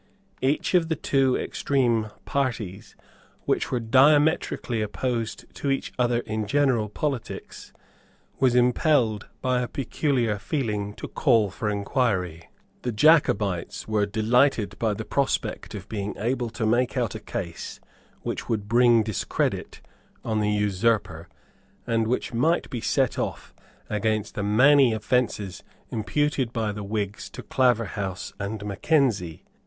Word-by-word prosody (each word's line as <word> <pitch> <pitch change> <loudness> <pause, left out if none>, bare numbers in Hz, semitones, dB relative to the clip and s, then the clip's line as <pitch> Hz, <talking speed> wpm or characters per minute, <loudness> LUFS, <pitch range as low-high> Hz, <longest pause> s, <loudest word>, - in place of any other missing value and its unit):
Each 140 +7 +1
of 170 -3 +3
the 160 - +1
two 135 -2 +2
extreme 120 -6 0 0.2
parties, 115 -9 -3 0.5
which - - 0
were 125 - 0
diametrically 135 0 +3
opposed 115 +1 -3
to 140 - -3
each 135 - -1
other 120 -1 +2
in 110 -2 -3
general 125 -4 +2
politics, 135 +2 -5 0.7
was 130 -2 +3
impelled 125 - +2 0.2
by 125 -1 +2
a 125 - -2
peculiar 125 -5 -1
feeling 105 -6 -2
to - - -7
call 115 -8 +2
for 105 +2 -3
inquiry. 100 - -1 0.3
The 125 - -2
Jacobites 105 - +2
were 105 -2 +1
delighted 110 -1 +2
by 110 -2 +1
the 110 - -6
prospect 140 -5 -1
of 100 0 -8
being 105 -2 -4
able 120 +2 -1
to 115 0 -3
make 120 +4 +1
out 120 -5 0
a - - -6
case 85 -1 -6 0.4
which - - -4
would 105 -3 -1
bring 120 0 +5
discredit 105 -3 -2 0.4
on 110 -2 0
the 105 0 +1
usurper, 105 -4 0 0.6
and 115 -1 +1
which 125 +1 -1
might 160 +9 +1
be 120 - -3
set 130 0 +1
off - - -4 0.3
against 110 0 -1
the - - -3
many 125 +5 +5
offences 110 -3 -1 0.3
imputed 130 +3 0
by 110 -3 -1
the 105 0 -6
Whigs 105 0 -3
to - - -9
Claverhouse 110 -7 0
and 100 +1 -4
Mackenzie. 105 - 0
115 Hz, 135 wpm, -25 LUFS, 105-130 Hz, 0.7 s, bring